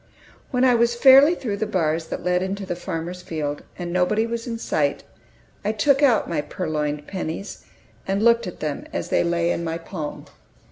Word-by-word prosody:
When 250 Hz, -2 st, +1 dB
I 250 Hz, -, +5 dB
was 235 Hz, 0 st, +3 dB
fairly 275 Hz, +6 st, +7 dB
through 215 Hz, -10 st, -3 dB
the 215 Hz, +1 st, -2 dB
bars 165 Hz, -4 st, 0 dB
that -, -, -5 dB
led 180 Hz, 0 st, +1 dB
into 195 Hz, +1 st, -3 dB
the 180 Hz, -, -3 dB
farmer's 175 Hz, +1 st, -5 dB
field, 150 Hz, -4 st, -4 dB, 0.2 s
and 175 Hz, -1 st, -5 dB
nobody 185 Hz, +5 st, +2 dB
was 230 Hz, +1 st, -4 dB
in 230 Hz, -1 st, -3 dB
sight, 145 Hz, -9 st, -1 dB, 0.6 s
I 210 Hz, +1 st, 0 dB
took 275 Hz, +6 st, +3 dB
out 255 Hz, -7 st, +4 dB
my 160 Hz, -3 st, -1 dB
purloined 150 Hz, -3 st, -3 dB
pennies, 190 Hz, +1 st, -5 dB, 0.4 s
and 195 Hz, +2 st, 0 dB
looked 235 Hz, -3 st, +4 dB
at 180 Hz, -, -8 dB
them 150 Hz, -2 st, -3 dB
as -, -, -4 dB
they -, -, +2 dB
lay 170 Hz, 0 st, +1 dB
in 170 Hz, -, -2 dB
my 165 Hz, 0 st, -2 dB
palm. 165 Hz, -3 st, -6 dB
180 Hz, 190 wpm, -23 LUFS, 165-230 Hz, 0.6 s, fairly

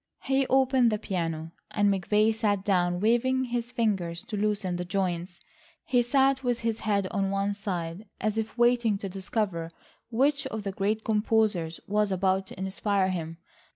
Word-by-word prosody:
He 270 Hz, 0 st, +1 dB
opened 260 Hz, -2 st, +4 dB
the 215 Hz, -, +1 dB
piano, 165 Hz, -5 st, -3 dB, 0.2 s
and 205 Hz, -1 st, +2 dB
McVay 210 Hz, +3 st, +2 dB
sat 205 Hz, -3 st, 0 dB
down 175 Hz, -3 st, +2 dB
waving 250 Hz, +4 st, +2 dB
his 240 Hz, -1 st, -3 dB
fingers 190 Hz, -8 st, -1 dB
to 215 Hz, -, -6 dB
loosen 205 Hz, -3 st, 0 dB
the 180 Hz, -, -2 dB
joints. 180 Hz, -1 st, -2 dB, 0.5 s
He 245 Hz, -1 st, +3 dB
sat 270 Hz, +2 st, +2 dB
with 245 Hz, -2 st, 0 dB
his 230 Hz, -1 st, -1 dB
head 200 Hz, -3 st, 0 dB
on 195 Hz, -2 st, 0 dB
one 195 Hz, +1 st, 0 dB
side, 185 Hz, -1 st, -4 dB
as 215 Hz, -1 st, 0 dB
if 220 Hz, +1 st, -3 dB
waiting 240 Hz, -3 st, +3 dB
to 195 Hz, 0 st, -5 dB
discover 190 Hz, -3 st, -2 dB, 0.4 s
which 275 Hz, +4 st, +1 dB
of 220 Hz, -1 st, -5 dB
the 200 Hz, -, -2 dB
great 210 Hz, +3 st, -1 dB
composers 210 Hz, -6 st, +1 dB
was 210 Hz, 0 st, +1 dB
about 190 Hz, 0 st, +1 dB
to -, -, -10 dB
inspire 190 Hz, 0 st, 0 dB
him. 165 Hz, -3 st, -4 dB
205 Hz, 165 wpm, -28 LUFS, 185-230 Hz, 0.5 s, opened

